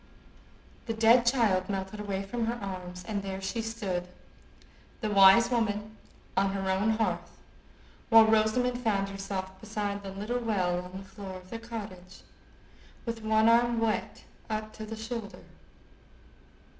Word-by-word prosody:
The 225 - -2
dead 230 +2 +5
child 210 -7 +3
melted 195 +1 -3
away 200 -2 -3
from 225 +3 -2
her 235 - 0
arms, 185 -4 -7
and 205 -2 -2
there 195 -1 -5
she 210 +4 -3
stood, 205 -6 -3 0.9
the 215 -4 -2
wise 200 +4 +7
woman, 215 -2 -1 0.4
on 195 0 +2
her 195 -1 -1
own 195 +4 +1
hearth, 225 - -2 0.7
while 225 -1 +9
Rosamond 220 +3 +2
found 200 -5 0
herself 190 -1 -5
beside 205 -2 -3
the 195 - -7
little 210 +6 -3
well 185 -6 0
on 180 +1 -8
the 195 0 -10
floor 195 -3 -8
of 185 0 -15
the 230 - -4
cottage, 205 -6 -8 0.8
with 230 -1 -4
one 220 0 +3
arm 235 0 +4
wet 225 -1 -1 0.3
up 215 0 -3
to 215 0 -8
the 225 - -5
shoulder. 220 -2 -6
210 Hz, 145 wpm, -29 LUFS, 195-225 Hz, 0.9 s, while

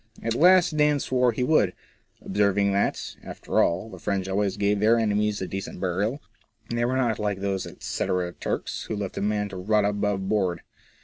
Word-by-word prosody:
At 115 - 0
last 175 +4 +5
Dan 150 -1 +3
swore 125 -2 +2
he 120 +3 -2
would, 125 - +3 0.5
observing 100 0 +2
that, 100 +1 -1
after - - -1
all, 90 +5 +1
the - - -11
French 95 -1 -2
always 100 +1 0
gave 100 0 +1
their 110 +3 +4
enemies 105 -2 0
a - - -4
decent 95 -1 -6
burial; 100 - -1 0.5
they 120 0 +1
were 130 +2 0
not 120 -4 +1
like 105 -2 -1
those 95 -1 -2
etcetera 90 -2 -2
Turks, - - -4
who - - -3
left 100 -2 -4
a - - -3
man 105 0 0
to 95 - -7
rot 105 +3 +2
above 100 -1 -1
board. 95 -5 0
105 Hz, 185 wpm, -25 LUFS, 95-115 Hz, 0.5 s, last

